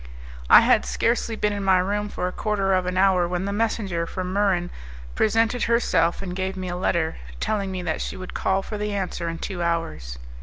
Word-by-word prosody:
I - - +10
had - - +4
scarcely 230 -1 0
been 210 -1 0
in 200 -1 -3
my 190 -1 +4
room 205 +3 -1
for 180 - -3
a - - -3
quarter 195 -1 0
of 185 -1 +1
an 180 0 -2
hour 185 -2 +4
when 180 +1 -2
the 200 - -2
messenger 200 -6 -1
from 185 +1 -4
Muran 190 -3 +1 0.4
presented 225 +2 +2
herself 230 -6 +2
and 180 -2 -5
gave 190 0 -3
me 185 -1 -4
a 175 - -3
letter, 170 -3 0 0.2
telling 200 -3 -1
me 185 -1 -4
that - - -2
she - - -4
would 185 -1 -8
call 190 0 0
for 210 +1 -6
the 210 0 -2
answer 180 -3 -3
in 165 - -5
two 180 0 -5
hours. 165 - -2
190 Hz, 215 wpm, -24 LUFS, 180-205 Hz, 0.4 s, I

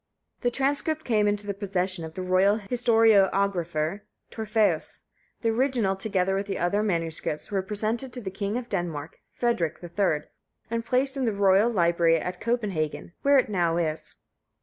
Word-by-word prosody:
The 245 - +1
transcript 285 +5 0
came 210 -3 +2
into 205 0 0
the 200 - -2
possession 190 -3 -2
of 160 0 -8
the 185 - -4
royal 185 +3 +3
historiographer 200 -6 +2 0.3
Torfæus; 220 -1 0 0.4
the 230 - +1
original, 230 -4 +1
together 190 -1 0
with 195 +1 -2
other 195 +2 0
MSS., 165 -4 -2
was 195 -2 -1
presented 220 +5 -1
to 250 - -4
the 190 -4 -5
King 200 +3 -2
of 250 -1 -5
Denmark, 160 -6 -4
Frederick. 180 -10 -1
III., 170 -3 -1 0.4
and 230 0 -1
placed 265 +3 0
in 265 - 0
the 225 - +1
royal 200 +2 +4
library 170 -5 +3
at 180 +2 -5
Copenhagen, 200 -10 -2
where 280 0 +5
it 260 - +3
now 175 -5 +1
is. 155 -2 -2
200 Hz, 155 wpm, -26 LUFS, 175-230 Hz, 0.4 s, where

